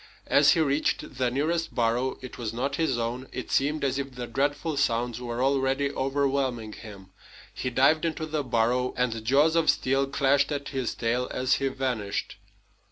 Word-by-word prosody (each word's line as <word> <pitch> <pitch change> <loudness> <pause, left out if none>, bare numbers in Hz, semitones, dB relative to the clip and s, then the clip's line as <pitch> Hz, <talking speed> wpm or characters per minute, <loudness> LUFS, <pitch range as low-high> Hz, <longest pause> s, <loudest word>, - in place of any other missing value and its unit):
As - - +5
he 170 - 0
reached 140 -3 0
the 125 -1 +2
nearest 160 +6 -1
burrow 120 +2 +1
it 130 - -8
was 115 -2 -3
not 135 +4 -2
his 155 -7 +1
own 120 +3 -3
it 130 - -6
seemed 150 +3 +1
as 135 0 0
if 135 -2 -5
the 125 -1 -4
dreadful 145 +6 -1
sounds 120 -3 0
were 120 0 -2
already 135 +1 +1
overwhelming 135 -5 -1
him. 100 -4 -11 0.4
He 125 - -3
dived 135 +5 +3
into 160 -1 -2
the 155 -1 -2
burrow, 125 +1 +1
and 115 -3 -1
jaws 145 +7 +3
of 165 -1 +3
steel 135 +1 +2
clashed 140 +1 +2
at 140 -1 -3
his 130 -4 -3
tail 120 +2 0
as 130 +1 0
he 135 - +1
vanished. 130 -6 -3
130 Hz, 175 wpm, -27 LUFS, 120-140 Hz, 0.4 s, As